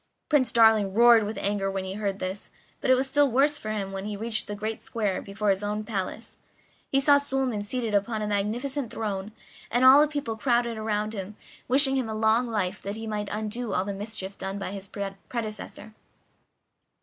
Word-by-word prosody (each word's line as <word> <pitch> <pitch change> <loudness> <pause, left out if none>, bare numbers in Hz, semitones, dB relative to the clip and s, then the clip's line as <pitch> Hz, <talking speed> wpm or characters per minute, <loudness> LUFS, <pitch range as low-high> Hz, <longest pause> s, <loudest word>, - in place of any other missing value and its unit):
Prince 260 -6 +3
Darling 220 -4 +4
roared 235 -1 +7
with 215 +2 -5
anger 200 -1 -1
when 195 -1 -3
he 190 - -4
heard 200 -1 -2
this; 190 +1 -5 0.3
but - - -2
it 260 - +7
was 260 +1 0
still 285 +1 +3
worse 285 +4 +3
for 215 - -6
him 200 -3 -3
when 195 0 -5
he 210 -1 -4
reached 220 +1 0
the 205 - -4
great 215 +2 -4
square 210 -5 -2
before 200 +1 -1
his 195 0 -1
own 210 +1 -2
palace. 210 +1 -5 0.5
He 275 - +4
saw 285 +1 +5
Suliman 265 -6 -1
seated 230 0 -3
upon 215 +2 0
a - - -2
magnificent 235 +6 -2
throne, 210 -3 -4 0.4
and 245 +2 +2
all 265 +3 +9
the 305 - +4
people 285 -7 -3
crowded 235 -1 +1
round, 210 -2 -3 0.3
wishing 270 +1 +5
him 250 -4 -1
a 220 - -3
long 220 +3 +2
life 210 -3 -2
that 200 +1 -5
he 225 +1 -6
might 210 -2 -3
undo 215 +1 -3
all 185 - 0
the 200 - -3
mischief 200 -1 -6
done 195 +1 -4
by 195 -2 -4
his 195 -1 -7 0.4
predecessor. 220 -2 -6
215 Hz, 195 wpm, -26 LUFS, 200-240 Hz, 0.5 s, all